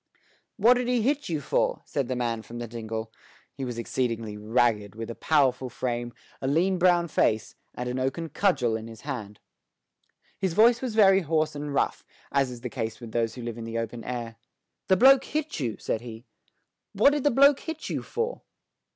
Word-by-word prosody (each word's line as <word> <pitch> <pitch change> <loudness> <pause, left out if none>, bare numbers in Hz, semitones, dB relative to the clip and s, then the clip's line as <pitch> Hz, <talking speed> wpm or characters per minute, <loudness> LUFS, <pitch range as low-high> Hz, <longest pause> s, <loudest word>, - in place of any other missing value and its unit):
"What 235 +4 +5
did 250 -1 -1
he 245 -3 +1
hit 285 0 0
you 155 -3 -1
for?" - - 0
asked 140 -4 -2
the 130 - -2
man 120 -2 -1
from 115 +3 -10
the 120 0 -5
dingle. 110 -1 -5 0.4
He 135 - -6
was 120 -2 -4
exceedingly 115 -2 -2
ragged, 105 -1 +1
with 115 +1 -5
a - - -5
powerful 130 -3 +1
frame, 120 -1 -3 0.3
a 130 - -2
lean 175 +6 +2
brown 175 -1 +4
face, 110 -8 +1 0.2
and 125 - -4
an 125 +1 -2
oaken 140 +6 -2
cudgel 140 - +1
in 110 0 -5
his 115 -1 -11
hand. 110 -8 -6 1.0
His 190 -3 0
voice 230 +2 +5
was 250 -4 -3
very 195 -3 +6
hoarse 155 -1 0
and 145 0 -5
rough, 140 - 0 0.3
as 135 -2 +2
is 120 -1 -9
the 125 - -4
case 115 -3 -4
with 120 -3 -9
those 115 -1 -1
who 125 - -7
live 120 0 -5
in - - -6
the 115 0 -4
open 115 0 -4
air. 115 -2 -5 0.5
"The 190 - +4
bloke 270 +4 +7
hit 310 - -3
you," 120 -6 -2
said 110 - -2
he. 115 0 -9 0.7
"What 280 - +5
did 290 -2 -1
the 290 - +4
bloke 280 +2 +5
hit 320 -1 -6
you - - -2
for?" 470 +2 -3
130 Hz, 200 wpm, -27 LUFS, 115-190 Hz, 1.0 s, bloke